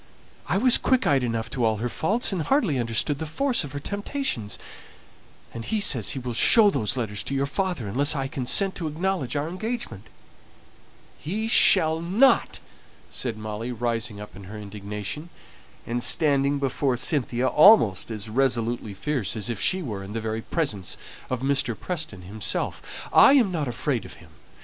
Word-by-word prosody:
I 180 - +1
was 245 +3 +5
quick 260 -1 +1
eyed 135 -2 +2
enough 115 -1 -2
to 125 - -2
all 110 -1 +2
her 115 +4 -2
faults, 200 - +1
and 180 - -2
hardly 190 - +1
understood 120 +5 0
the 160 - -4
force 250 - 0
of 145 -2 -8
her 145 - -4
temptations; 200 - -3 1.0
and 115 - -6
he 215 - -1
says 125 - +3
he - - -6
will 125 -2 -4
show 205 - +6
those 120 - -1
letters 105 -4 -2
to 140 - -4
your 135 0 0
father, 150 - -2
unless 140 +9 +2
I 135 -2 -2
consent 140 +9 0
to 165 - -3
acknowledge 160 -3 -2
our 145 +1 -1
engagement." 185 - -5 1.1
"He 215 +8 -3
shall 160 -7 +5
not!" 205 +11 +3 0.5
said 120 -4 -3
Molly, 110 +2 -5
rising 115 -3 -3
up 105 -2 -10
in 100 0 -11
her 105 +4 -9
indignation, 105 - -7 0.6
and 120 +1 -3
standing 140 0 +3
before 135 -1 -1
Cynthia 125 -3 0
almost 150 - +5
as 110 -1 -4
resolutely 120 -3 0
fierce 125 -3 -2
as 110 +1 -2
if 115 - -5
she 185 -1 +2
were 105 -8 -5
in 100 +2 -9
the 115 - -2
very 110 0 -3
presence 110 - -3 0.3
of 130 -1 -3
Mr. 135 -4 0
Preston 155 - -5
himself. 100 +3 -4
"I - - +7
am 240 -9 +4
not 155 -5 -2
afraid 115 -5 -2
of - - -10
him. - - -17
135 Hz, 175 wpm, -24 LUFS, 110-170 Hz, 1.1 s, I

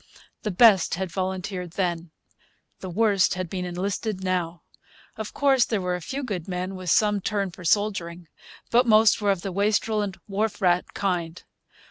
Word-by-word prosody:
The 215 - -2
best 195 -2 +5
had 185 0 -4
volunteered 185 -1 -4
then. 175 -3 -2 0.7
The 185 - -7
worst 200 0 +2
had 180 -2 -5
been 180 -1 -3
enlisted 190 +3 -3
now. 175 -3 -2 0.5
Of 220 -1 -6
course, 270 -3 +3
there 220 -3 -1
were 180 -1 -2
a 180 - -3
few 270 +11 -5
good 190 -10 -4
men 185 +1 -3
with 185 -2 -5
some 210 +1 +3
turn 200 -2 -1
for 180 - -12
soldiering. 175 -3 0 0.4
But 245 +1 +4
most 220 -1 +5
were 205 - +1
of 195 -3 0
the 195 - -3
wastrel 210 +2 +1
and 195 -2 -4
wharf 205 +1 -2
rat 180 -3 +1
kind. 175 -3 -2
190 Hz, 170 wpm, -25 LUFS, 180-210 Hz, 0.7 s, best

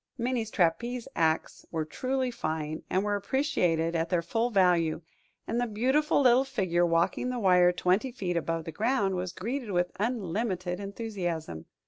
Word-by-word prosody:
Minnie's 240 -2 -1
trapeze 225 +7 0
acts 160 -1 0
were 160 -2 -2
truly 255 +9 -2
fine, 155 -7 -3
and 190 +2 +1
were 205 0 0
appreciated 180 - 0
at 165 0 0
their 175 -2 +1
full 225 +8 0
value; 175 -6 +3 0.4
and 235 +2 -1
the 245 - 0
beautiful 265 +8 +2
little 255 0 +5
figure 180 -10 +1
walking 170 +8 +1
the 250 - -2
wire 180 -4 +5
twenty 185 +8 +1
feet 185 -8 -3
above 165 -1 -2
the 165 - -5
ground 215 - +1
was 180 -1 -3
greeted 235 +5 -4
with 180 -2 0
unlimited 195 -4 -2
enthusiasm. 190 - -4
190 Hz, 155 wpm, -29 LUFS, 170-240 Hz, 0.4 s, little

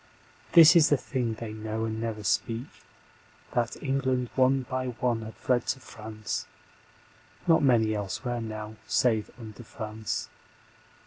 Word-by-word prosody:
This 170 0 +9
is 165 -3 +6
the 145 - +4
thing 125 -3 -2
they 110 -1 -6
know 110 +1 -3
and 110 0 -3
never 110 -2 -3
speak, 115 +4 0 0.9
That 120 -1 -1
England 130 -3 0
one 130 0 +3
by 130 0 -3
one 120 -1 -1
had 110 -2 -8
fled 120 +5 0
to - - -1
France 110 -4 -6 1.0
(Not 165 -2 +5
many 115 -6 +3
elsewhere 115 +4 -3
now 110 -1 -6
save 110 -4 +2
under 110 0 -9
France). 110 -2 -5
115 Hz, 135 wpm, -28 LUFS, 110-130 Hz, 1.0 s, This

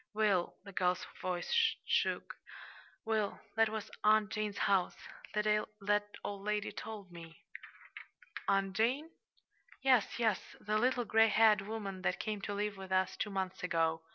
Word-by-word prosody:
"Will" 205 -5 +2
the 200 - -10
girl's 180 -1 0 0.2
voice 185 - +1
shook - - 0 0.7
"Will, 220 -2 0 0.2
that 225 -1 +4
was 220 -1 -5
Aunt 215 0 +4
Jane's 210 -2 -2
house. 190 -3 +2 0.4
That 210 0 +1 0.8
old 200 -1 -4
lady 210 0 -1
told 210 -4 -8
me." 165 -1 -11 1.1
"Aunt 195 -1 +1
Jane?" 260 +9 +1 0.7
"Yes, 255 -5 +3
yes 220 -5 0
the 215 0 0
little 245 0 +2
gray 225 +1 +5
haired 215 -2 +5
woman 200 -2 -5
that - - 0
came 210 -2 -3
to 205 - -3
live 205 0 -2
with 190 -1 -9
us 185 0 +2
two 215 - -2
months 190 -2 -3
ago. 165 -2 +1
210 Hz, 145 wpm, -34 LUFS, 190-220 Hz, 1.1 s, gray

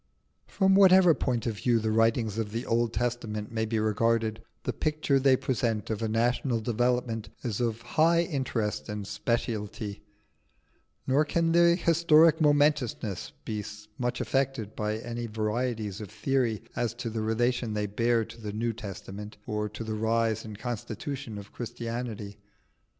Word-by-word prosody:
From 190 -1 +3
whatever 190 -3 +7
point 125 -5 -1
of 115 -3 -2
view 120 +5 +2
the 110 -1 0
writings 115 -1 +2
of 105 -2 -2
the 115 +3 -3
Old 115 0 +1
Testament 115 -3 -2
may 110 -1 -1
be 110 +1 -1
regarded, 110 +1 +1 0.2
the - - -2
picture 150 -3 +1
they 135 0 +5
present 115 -5 -1
of 110 0 -2
a 110 - 0
national 120 +2 +1
development 120 -1 0
is 115 -2 -2
of 115 -1 -1
high 165 +7 +3
interest 130 -10 -2
and 105 -1 -4
speciality, 105 -1 -3 1.0
nor 140 +3 +3
can 165 +2 +1
their 170 0 +6
historic 165 -1 +5
momentousness 145 - +2
be 105 -1 -3 0.4
much 125 -1 -1
affected 135 -6 -1
by 105 0 -1
any 120 +1 -5
varieties 110 -1 -2
of 105 - -7
theory 115 0 0
as 120 -1 -1
to 115 - -4
the 110 0 -2
relation 115 +1 0
they 105 0 0
bear 115 +2 +1
to 115 +2 -12
the 105 -1 -5
New 115 +2 -1
Testament 105 0 -8
or 105 0 -2
to 105 +2 -7
the 110 -1 -4
rise 110 0 +1
and 110 -2 -8
constitution 120 +1 -5
of 100 0 -10
Christianity. 115 -3 -5
115 Hz, 155 wpm, -28 LUFS, 110-125 Hz, 1.0 s, whatever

